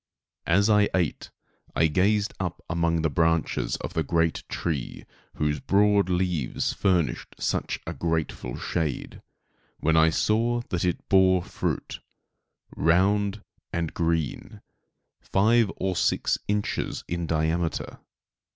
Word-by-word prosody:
As 100 +5 +4
I 105 -1 +4
ate 90 -5 -1 0.5
I - - +4
gazed 100 +6 +2
up 90 -2 -4
among 85 -1 0
the 80 - +2
branches 80 -6 +1
of - - -6
the 80 - 0
great 80 +1 +1
tree, 75 -7 -3 0.3
whose 75 -1 0
broad 100 +2 +3
leaves 90 -7 0
furnished 90 -5 0
such - - -2
a - - -4
grateful 80 -7 -2
shade, 80 -6 -3 0.6
when 80 +1 +2
I 80 0 +6
saw 115 +7 +1
that 90 - -1
it 90 -2 -1
bore 95 -2 +4
fruit, - - -3 0.8
round 100 +5 +2 0.3
and 85 -2 -2
green, 85 -3 -2 0.6
five 110 +2 +3
or 95 -1 -1
six - - +1
inches 105 0 -2
in 85 -1 -3
diameter. 80 +1 -1
85 Hz, 120 wpm, -26 LUFS, 80-100 Hz, 0.8 s, I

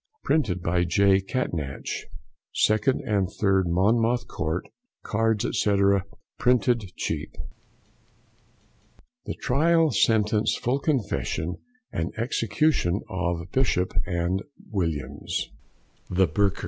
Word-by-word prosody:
Printed 95 - +1
by 90 +1 +2
J. 95 +3 +4
Catnach, 85 - -3 0.6
2 110 - +4 0.3
and 100 -5 +1
3, 95 -2 +3
Monmouth 115 +7 +2
Court. 80 +3 -3 0.4
Cards, 110 0 +1
&c., 105 -1 +2 0.6
Printed 120 -5 +2
Cheap. - - -3 1.9
THE - - -4
TRIAL, 160 +4 +3
SENTENCE, 110 -1 +2
FULL 130 +3 0
CONFESSION, 105 - -1 0.4
AND 80 +1 -2
EXECUTION 115 - +1
OF 90 -1 -2
BISHOP 105 -8 +1 0.4
& 110 +8 -9
WILLIAMS, 75 -8 -2 0.6
THE 95 +1 +3
BURKERS. 100 +5 +1
100 Hz, 95 wpm, -26 LUFS, 90-120 Hz, 1.9 s, J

